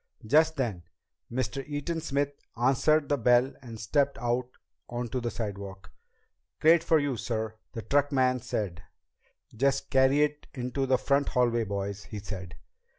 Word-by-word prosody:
Just 155 +6 +4
then 115 - -2 0.5
Mr. 130 +2 -2
Eaton 150 +3 -3
Smith 145 -2 0 0.3
answered 140 +4 +3
the 145 - +1
bell 125 +3 +4
and 115 -4 -9
stepped 140 +6 +1
out 120 +1 -1 0.4
onto 120 +1 -3
the 120 - -1
sidewalk. 100 -3 -6 0.7
"Crate 165 +1 +5
for 160 - +4
you, 145 -3 0
sir," 110 -2 -2 0.2
the 115 - -5
truckman 135 -3 +2
said. 100 -8 -3 0.7
"Just 135 +4 +1
carry 135 +2 +5
it 150 0 -2
into 130 +1 -2
the 130 0 +4
front 140 +2 +1
hallway, 120 -2 +2
boys," 100 0 -4
he 105 - -7
said. 95 -3 -7
125 Hz, 145 wpm, -28 LUFS, 110-140 Hz, 0.7 s, Crate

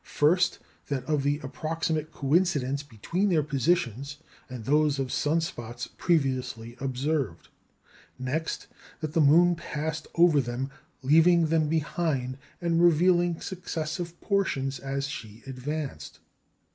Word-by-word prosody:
First, 175 +5 +2 0.3
that 135 -3 -2
of 150 -1 +1
the 145 +1 +1
approximate 155 +2 -2
coincidence 140 -3 +1
between 150 - -2
their 160 -5 +3
positions 140 - 0 0.3
and 125 -4 -7
those 150 +1 +3
of 135 -2 -2
sun 160 +3 +1
spots 120 -6 -5
previously 130 -8 0
observed. 135 - -2 0.7
Next, 140 +6 -3 0.4
that 155 -1 -3
"the 165 - +3
moon 170 +5 +6
passed 155 -1 -4
over 170 -4 +5
them, 125 +2 -4 0.3
leaving 165 +3 +5
them 155 -2 +2
behind, 150 -5 -1 0.2
and 170 -1 +1
revealing 175 0 +4
successive 170 -1 -4
portions 140 -10 0
as 135 0 -2
she 115 -6 -8
advanced." 130 - -5
150 Hz, 120 wpm, -27 LUFS, 130-165 Hz, 0.7 s, moon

